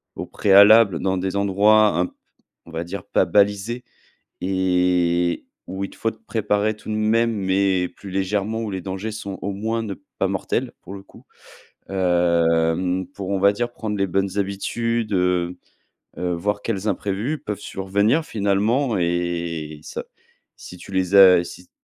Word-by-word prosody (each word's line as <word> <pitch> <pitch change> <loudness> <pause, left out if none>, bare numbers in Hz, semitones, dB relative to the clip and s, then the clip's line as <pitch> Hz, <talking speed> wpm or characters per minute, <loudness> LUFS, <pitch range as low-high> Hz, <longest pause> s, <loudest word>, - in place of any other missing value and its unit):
au - - -5
préalable 100 -2 +6
dans 95 0 0
des 95 +1 -3
endroits 100 +2 +4
un 90 - +2
peu, - - -20 0.5
on 85 - -14
va 80 0 -3
dire 90 +2 -7
pas - - +1
balisés, 105 +6 +1 0.6
et 90 -2 +1 0.2
où 95 +1 -5
il - - -9
te - - -16
faut 115 - -1 0.2
préparer 105 -1 0
tout 105 - -11
de 110 - -1
même, 115 +2 +2
mais 95 -2 +1
plus 100 - -12
légèrement, 100 +3 -1
où 110 -2 -4
les 95 -1 -4
dangers 95 +4 -5
sont 100 -2 -6
au 100 - -3
moins 110 +3 -2
ne 105 -3 -4 0.3
pas 95 - +2
mortels, 105 +6 -2
pour 95 - -10
le 95 - -10
coup - - -18 0.6
hem, 90 -1 +1
pour, 95 -2 -6
on 100 -1 0
va 100 +1 +4
dire 120 +3 -2
prendre 110 -3 -4
les 100 0 +1
bonnes 95 +2 -1
habitudes, 110 +3 -2
heu 90 -1 0 0.6
heu, 90 0 -1
voir 105 +4 -2
quels 105 -2 -3
imprévus 105 - -2
peuvent 105 -7 -6
survenir 100 +12 0
finalement 110 +5 0
et 85 -3 -2
ça - - -6 0.5
si - - -11
tu 90 - -12
les 95 +1 0
as, 90 -3 +8
si 90 +1 -12
95 Hz, 165 wpm, -22 LUFS, 90-105 Hz, 0.6 s, as